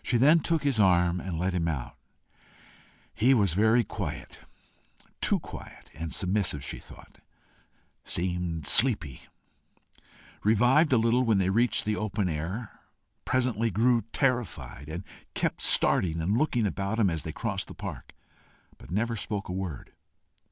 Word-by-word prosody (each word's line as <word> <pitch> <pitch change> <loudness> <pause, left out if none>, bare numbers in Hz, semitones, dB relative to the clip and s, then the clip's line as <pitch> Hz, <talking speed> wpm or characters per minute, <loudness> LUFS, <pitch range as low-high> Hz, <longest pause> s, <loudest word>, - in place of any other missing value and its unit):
She 120 - +1
then 150 +7 +5
took 165 -1 -1
his 140 -6 0
arm 90 -2 +3
and 90 -2 -5
led 90 +3 -1
him 85 -2 -1
out. 70 -7 -4 1.2
He 130 +5 +3
was 100 -7 +2
very 110 +5 +3
quiet - - -7 0.8
too - - +2
quiet - - -12
and 80 +1 -6
submissive, 95 -7 -1
she - - -5
thought - - -16 0.8
seemed 85 -3 -3
sleepy, 95 - +3 1.2
revived 125 +9 +3
a 130 - +4
little 115 +2 +2
when 115 -4 +2
they 95 -1 +1
reached 120 +4 +2
the 105 0 -1
open 105 -2 -2
air, 90 +9 -5 0.5
presently 120 -3 0
grew 115 +4 +2
terrified, 120 - -2
and 85 +4 -6 0.3
kept - - -2
starting 85 -2 +5
and 90 +6 0
looking 125 -4 +1
about 100 +2 -2
him 105 -6 +2
as 80 -2 -2
they - - -5
crossed - - -4
the - - -11
park, - - -8 0.7
but - - -14
never 115 +5 -1
spoke 105 -2 -4
a - - -3
word. 90 -8 -6
105 Hz, 145 wpm, -27 LUFS, 90-120 Hz, 1.2 s, then